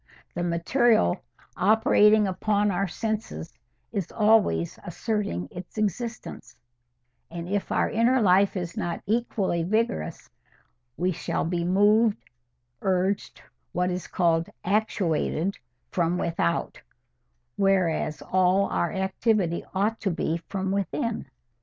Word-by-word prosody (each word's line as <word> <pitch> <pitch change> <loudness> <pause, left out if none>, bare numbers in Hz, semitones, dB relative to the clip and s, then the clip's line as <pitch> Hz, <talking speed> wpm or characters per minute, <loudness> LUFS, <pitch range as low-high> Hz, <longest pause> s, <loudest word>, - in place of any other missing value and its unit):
The 175 - -3
material, 175 - +2 0.3
operating 210 +1 +4
upon 205 +2 +1
our 195 +2 0
senses, 220 +4 -4 0.4
is 200 -6 -3
always 210 -6 +2
asserting 175 - -2
its 180 +4 -10
existence; 220 +3 -4 0.7
and 170 0 -6
if 200 +1 -2
our - - +2
inner 240 +4 +2
life 195 -1 +4
is 175 -2 -4
not 170 -1 -3
equally 205 -5 0
vigorous, 190 - -1 0.7
we 180 +1 +1
shall 165 - -2
be 170 +1 -1
moved, 205 +4 +4 0.6
urged, 190 +1 -1 0.3
what 180 +1 0
is 180 0 -4
called 170 -2 +1 0.2
actuated, 195 -3 0 0.3
from 175 0 +1
without, 165 - -1 0.7
whereas 185 -6 +1
all 185 +1 +2
our 170 - 0
activity 190 -2 0
ought 210 +4 0
to 200 - -1
be 165 -1 -1
from 190 -1 -2
within. 200 0 -2
190 Hz, 110 wpm, -26 LUFS, 175-215 Hz, 0.7 s, operating